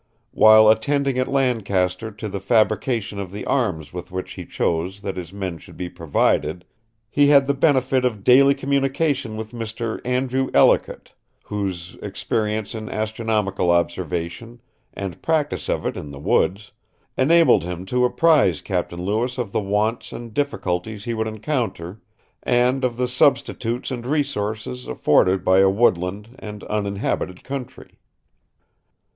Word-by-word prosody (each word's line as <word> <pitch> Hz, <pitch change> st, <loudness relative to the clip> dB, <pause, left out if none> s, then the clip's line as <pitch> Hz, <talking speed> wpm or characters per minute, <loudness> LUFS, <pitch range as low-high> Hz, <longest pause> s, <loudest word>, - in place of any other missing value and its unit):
While 110 Hz, 0 st, +7 dB
attending 135 Hz, +4 st, +2 dB
at 130 Hz, -, 0 dB
Lancaster 110 Hz, -7 st, 0 dB
to 110 Hz, 0 st, -7 dB
the 100 Hz, -1 st, -4 dB
fabrication 110 Hz, +1 st, +1 dB
of 95 Hz, -3 st, -5 dB
the 100 Hz, -, -6 dB
arms 85 Hz, -, -1 dB
with 90 Hz, -1 st, -7 dB
which 95 Hz, 0 st, -5 dB
he -, -, -9 dB
chose 90 Hz, +4 st, -2 dB
that 100 Hz, -2 st, -4 dB
his 90 Hz, -2 st, -7 dB
men 95 Hz, -4 st, -5 dB
should -, -, -15 dB
be 90 Hz, -1 st, -4 dB
provided, 85 Hz, +2 st, 0 dB, 0.4 s
he 145 Hz, +6 st, +3 dB
had 140 Hz, -1 st, +6 dB
the 140 Hz, -, +1 dB
benefit 135 Hz, -2 st, +2 dB
of 110 Hz, -6 st, -1 dB
daily 140 Hz, +4 st, +6 dB
communication 135 Hz, -3 st, 0 dB
with 110 Hz, 0 st, -6 dB
Mr. 115 Hz, -1 st, -5 dB
Andrew 130 Hz, +1 st, 0 dB
Ellicott, -, -, +3 dB, 0.3 s
whose 95 Hz, -4 st, -4 dB
experience 105 Hz, -1 st, -2 dB
in 110 Hz, -1 st, -6 dB
astronomical 110 Hz, -4 st, -1 dB
observation, 85 Hz, +6 st, -2 dB, 0.3 s
and 95 Hz, -3 st, -6 dB
practice 155 Hz, -2 st, -1 dB
of -, -, -1 dB
it -, -, -2 dB
in 75 Hz, -, -7 dB
the 70 Hz, -, -9 dB
woods, 100 Hz, +8 st, 0 dB, 0.4 s
enabled 165 Hz, -, +4 dB
him 90 Hz, +1 st, -5 dB
to 125 Hz, +5 st, 0 dB
apprise 130 Hz, -, +3 dB
Captain 85 Hz, +1 st, -3 dB
Lewis 115 Hz, +6 st, -1 dB
of 120 Hz, -6 st, -3 dB
the -, -, 0 dB
wants 105 Hz, +3 st, -1 dB
and 120 Hz, -2 st, -8 dB
difficulties 105 Hz, -7 st, -2 dB
he 120 Hz, -, -2 dB
would 110 Hz, 0 st, -2 dB
encounter, 110 Hz, -, -3 dB, 0.4 s
and 125 Hz, +2 st, +2 dB
of 120 Hz, -2 st, 0 dB
the 125 Hz, 0 st, 0 dB
substitutes 125 Hz, -1 st, 0 dB
and 120 Hz, -1 st, -5 dB
resources 105 Hz, -, -2 dB
afforded 95 Hz, +7 st, +2 dB
by 95 Hz, +1 st, +5 dB
a 95 Hz, 0 st, +6 dB
woodland 100 Hz, +2 st, 0 dB
and 105 Hz, -1 st, -8 dB
uninhabited 100 Hz, -3 st, -3 dB
country." 135 Hz, -2 st, -8 dB
110 Hz, 145 wpm, -22 LUFS, 95-125 Hz, 0.4 s, While